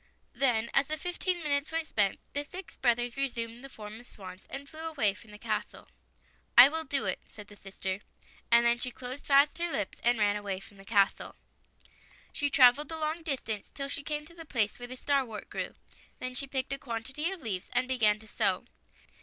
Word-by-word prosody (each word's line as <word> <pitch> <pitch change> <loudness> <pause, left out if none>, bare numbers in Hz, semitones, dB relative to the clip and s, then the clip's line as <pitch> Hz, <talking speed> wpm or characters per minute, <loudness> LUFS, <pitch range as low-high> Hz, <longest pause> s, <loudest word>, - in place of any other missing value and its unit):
Then, 235 -4 +2
as 275 0 +3
the 310 - -1
fifteen 355 0 -2
minutes 285 0 0
were 325 0 0
spent, 205 -10 +1
the 285 - 0
six 340 +3 -9
brothers 240 -1 +1
resumed 240 -3 -2
the 275 - -8
form 215 -2 -9
of 245 - -14
swans 185 -2 -11
and 280 +1 -6
flew 315 +2 -11
away 305 -11 +1
from 210 +2 -16
the 210 - -11
castle. - - -4 0.3
" - - -36
I 255 - +12
will 320 +1 -2
do 275 0 +1
it," - - 0
said 210 -2 -11
the 205 - -12
sister. 195 -1 -4 0.5
And 235 0 +7
then 235 0 +4
she 250 - 0
closed 255 +2 -6
fast 285 +3 +5
her 345 0 -1
lips 205 -9 -2
and 240 0 +4
ran 205 -1 +3
away 200 -2 -3
from 200 +1 -15
the 195 - -14
castle. 200 -2 +2 1.0
She 290 -2 +1
traveled 275 +1 +6
a 320 - -3
long 315 +2 -1
distance 255 - -3
till 275 -1 -3
she 280 - -2
came 300 +1 -3
to 335 - -11
the 335 -1 -9
place 225 -9 0
where 245 - -6
the 255 +1 -7
starwort 260 -6 -1
grew. - - -4 0.4
Then 255 0 -4
she 275 +2 -1
picked 265 0 -1
a 275 - -4
quantity 260 +7 -2
of 380 -3 -6
leaves 195 -6 -3
and 255 - +1
began 220 -5 +3
to 220 - -12
sew. - - +1
255 Hz, 210 wpm, -30 LUFS, 220-290 Hz, 1.0 s, I